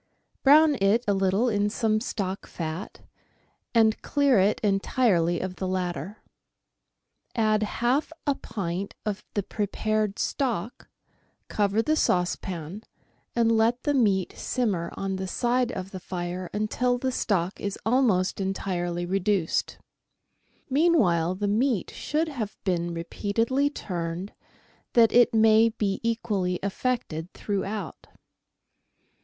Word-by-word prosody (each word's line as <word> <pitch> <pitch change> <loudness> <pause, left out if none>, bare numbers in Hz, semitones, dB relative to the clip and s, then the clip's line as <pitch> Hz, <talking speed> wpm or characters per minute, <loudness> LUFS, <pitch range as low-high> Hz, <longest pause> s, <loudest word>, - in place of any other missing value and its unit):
Brown 300 +2 +6
it 205 +5 +3
a 205 - +3
little 195 +4 +2
in 205 -2 +1
some 215 0 0
stock 195 -4 -4
fat, 165 +3 -6 0.7
and 220 -1 +4
clear 280 -6 +3
it 200 +3 +2
entirely 195 -4 +2
of 185 -1 -5
the 190 - -3
latter. 180 0 -3 1.1
Add 215 -2 +2
half 240 +8 0
a 285 - +3
pint 195 -6 -5
of 210 -2 -3
the 205 - 0
prepared 215 +1 -1
stock, 240 - -2 0.6
cover 210 +1 +1
the 310 +4 +2
saucepan, 180 - -1 0.5
and 230 -1 +3
let 230 +2 +2
the 290 - +1
meat 200 -8 +2
simmer 205 -10 -1
on 195 -1 -2
the 190 0 -4
side 245 +4 +1
of 190 +1 -6
the 190 - -6
fire 180 0 -5
until 245 +4 0
the 260 +1 -1
stock 195 -7 -1
is 200 -1 -3
almost 220 -7 +2
entirely 175 -2 -2
reduced. 195 -1 0 0.9
Mean 330 +5 +3
while 175 - +2
the 205 +2 -2
meat 225 0 +1
should 315 +2 -1
have 240 -9 -5
been 175 -3 0
repeatedly 225 +11 0
turned, 175 - -5 0.6
that 230 -2 +6
it 245 -1 +6
may 220 +1 +6
be 205 -3 -2
equally 205 -6 -1
affected 200 -6 -2
throughout. 200 -2 -4
205 Hz, 125 wpm, -26 LUFS, 185-235 Hz, 1.1 s, Brown